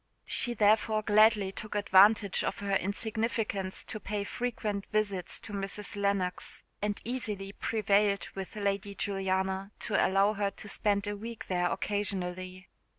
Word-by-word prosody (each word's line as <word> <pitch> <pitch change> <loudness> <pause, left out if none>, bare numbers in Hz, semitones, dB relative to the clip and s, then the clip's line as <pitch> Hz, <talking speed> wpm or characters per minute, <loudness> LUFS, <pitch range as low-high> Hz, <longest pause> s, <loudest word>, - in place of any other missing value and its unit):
She 240 -1 +1
therefore 215 +1 +3
gladly 210 -2 +5
took 210 +2 -7
advantage 205 0 +5
of - - -2
her 200 -1 -2
insignificance 210 -1 -1
to 215 - -6
pay 205 +1 -3
frequent 210 -3 -3
visits 205 -4 0
to 205 - -9
Mrs. 200 +2 -4
Lennox, 200 -3 -1 0.2
and 205 0 -1
easily 210 -5 -3
prevailed 205 -2 +1
with 195 +1 -6
Lady 200 -1 -2
Juliana 190 0 -1
to 210 - +1
allow 195 +2 +3
her 200 -1 0
to 205 - -12
spend 200 -1 +1
a 205 0 -2
week 225 +2 -7
there 175 -1 +1
occasionally. 185 -2 -3
200 Hz, 140 wpm, -30 LUFS, 195-215 Hz, 0.2 s, gladly